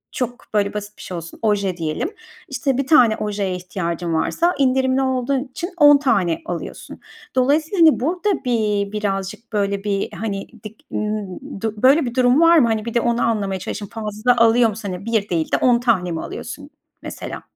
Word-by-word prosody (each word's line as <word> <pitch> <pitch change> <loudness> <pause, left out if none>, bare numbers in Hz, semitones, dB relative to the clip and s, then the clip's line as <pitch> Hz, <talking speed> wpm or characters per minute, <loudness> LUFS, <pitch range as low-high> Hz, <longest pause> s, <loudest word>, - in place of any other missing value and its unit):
çok 245 0 -4
böyle 200 -1 +1
basit 210 0 -6
bir - - -12
şey 180 - -6
olsun, 165 0 -9
oje 200 -4 0
diyelim. 155 - -2 0.4
İşte, 270 -2 -1
1 275 -1 -1
tane 240 -8 +5
ojeye 200 -3 -2
ihtiyacın 175 -2 -4
varsa 335 - +1
indirimli 260 0 +2
olduğun 260 0 0
için 315 +6 -6
10 290 -2 +7
tane 195 - +1
alıyorsun. 175 -1 -7 0.4
Dolayısıyla, 305 +8 +1
hani, 320 -5 +6
burada 355 - -1
bi - - -5
bir 210 -4 0
birazcık 205 +2 -4
böyle 200 -1 -1
bir, 200 -1 -1
hani, 200 -3 -4 0.2
dik 215 0 -10
ımm, 210 +3 -4
du 220 -1 -3
böyle 275 +3 +5
bir 240 +1 -5
durum 255 +3 +4
var 335 0 +6
mı? 245 -7 +5
Hani, 220 -1 -1
bir 235 - -4
de 235 - +2
onu 235 0 0
anlamaya 200 -4 0
çalışalım. 205 +2 -6
Fazla 220 +2 0
alıyor 230 0 +5
musun? 210 -1 -6
Hani, 185 +4 -8
1 220 -3 0
değil 165 -3 -1
de - - +3
10 245 -2 +3
tane 200 -8 +1
mi 160 - -3
alıyorsun - - -7 0.3
mesela? - - -7
220 Hz, 190 wpm, -20 LUFS, 200-260 Hz, 0.4 s, 10